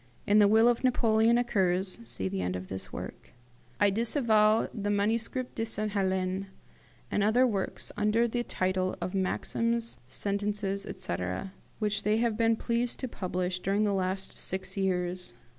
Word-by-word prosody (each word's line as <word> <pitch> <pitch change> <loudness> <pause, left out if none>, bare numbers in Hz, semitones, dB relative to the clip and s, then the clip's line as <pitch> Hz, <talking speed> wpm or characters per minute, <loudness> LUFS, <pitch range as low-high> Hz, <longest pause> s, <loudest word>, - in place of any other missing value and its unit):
In 205 +1 +5
the 205 - +7
will 220 +3 +5
of 240 0 +2
Napoleon 230 -2 +3
occurs 190 -5 +1
(see 95 - -2
end 90 0 -2
of 90 0 -6
this 95 0 -4
work): - - -8 0.5
"I 205 - +4
disavow 220 -1 +3
the 205 -3 -3
'Manuscrit 225 +5 0
de 225 - -2
Sainte 215 -1 0
Helene', 190 -1 -1 0.6
and - - +1
the 200 - +3
other 245 +4 +4
works 200 -6 -2
under 215 +3 +2
the 240 +1 -1
title 185 -3 -1
of 185 - -4
Maxims, 230 +4 -1
Sentences, 200 0 -1
etc., 90 - -4 0.2
which 210 -2 -1
they 210 +1 +2
have 230 -1 +1
been 225 0 +3
pleased 235 +1 -1
to 260 - -2
publish 185 -4 -3
during 195 +3 +1
the 205 -1 +1
last 190 0 -2
six 190 0 -3
years. 180 -7 -2
205 Hz, 160 wpm, -29 LUFS, 185-225 Hz, 0.6 s, the